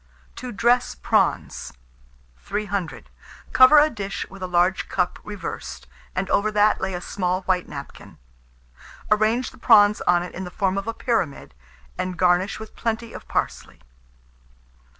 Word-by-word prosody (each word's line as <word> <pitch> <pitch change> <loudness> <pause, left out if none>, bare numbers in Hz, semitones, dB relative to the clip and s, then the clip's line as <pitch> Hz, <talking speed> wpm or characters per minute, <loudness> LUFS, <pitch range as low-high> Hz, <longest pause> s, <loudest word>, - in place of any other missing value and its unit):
TO 250 0 -6
DRESS 240 +3 +2
PRAWNS. 60 - 0 0.7
300. 200 - -4 0.4
Cover 260 +4 +8
a 300 +1 +6
dish 200 -3 -4
with 195 -1 -12
a 185 - -3
large 180 +1 +1
cup 180 -2 -1
reversed, 205 -2 -7 0.3
and 185 +1 -1
over 210 +2 +2
that 210 0 +3
lay 190 -1 -2
a - - -3
small 185 0 -2
white 180 -1 0
napkin. 140 -1 -10 0.9
Arrange 220 +4 +2
the - - -18
prawns 210 -3 +5
on 175 0 +4
it 180 - -8
in 190 - -6
the 180 - -6
form 195 0 0
of 195 - -8
a 230 - -1
pyramid, 220 - -2 0.5
and 185 -1 -3
garnish 180 +3 +2
with 220 0 -10
plenty 230 0 -3
of - - -10
parsley. - - -3
195 Hz, 150 wpm, -23 LUFS, 180-220 Hz, 0.9 s, Cover